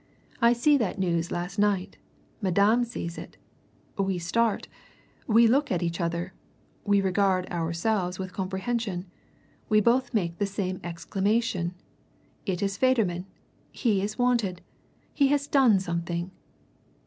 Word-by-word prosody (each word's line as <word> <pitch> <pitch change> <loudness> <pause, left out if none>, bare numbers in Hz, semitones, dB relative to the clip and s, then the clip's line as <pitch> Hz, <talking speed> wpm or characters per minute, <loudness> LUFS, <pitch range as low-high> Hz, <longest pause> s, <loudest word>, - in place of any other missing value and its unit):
I 235 +1 +6
see 285 +5 +4
that 220 -6 -1
news 175 -3 0
last 175 +3 -4
night 200 -3 +1 0.4
Madame 200 +5 +3
sees 195 -8 -5
it! - - -11 0.6
We 195 -1 +1
start 215 +6 0 0.6
we 230 +1 +6
look 275 +6 +3
at 175 -2 0
each 170 +1 -2
other 170 +2 -2 0.5
we 200 -1 +3
regard 190 -1 +1
ourselves 175 +3 -1
with 185 -1 -6
comprehension. 190 0 -2 0.6
We 215 -1 +5
both 240 +4 +2
make 175 -7 -1
the 205 - +1
same 190 -2 -3
exclamation 185 +2 -1 0.7
'It 185 0 -1
is 195 0 -1
Federman! 205 -9 +1 0.4
He 210 -6 +1
is 210 +2 -3
wanted! 235 -8 +1 0.5
He 280 - +3
has 285 0 +1
done 260 -8 +4
something!' 170 0 -3
195 Hz, 130 wpm, -27 LUFS, 175-230 Hz, 0.7 s, I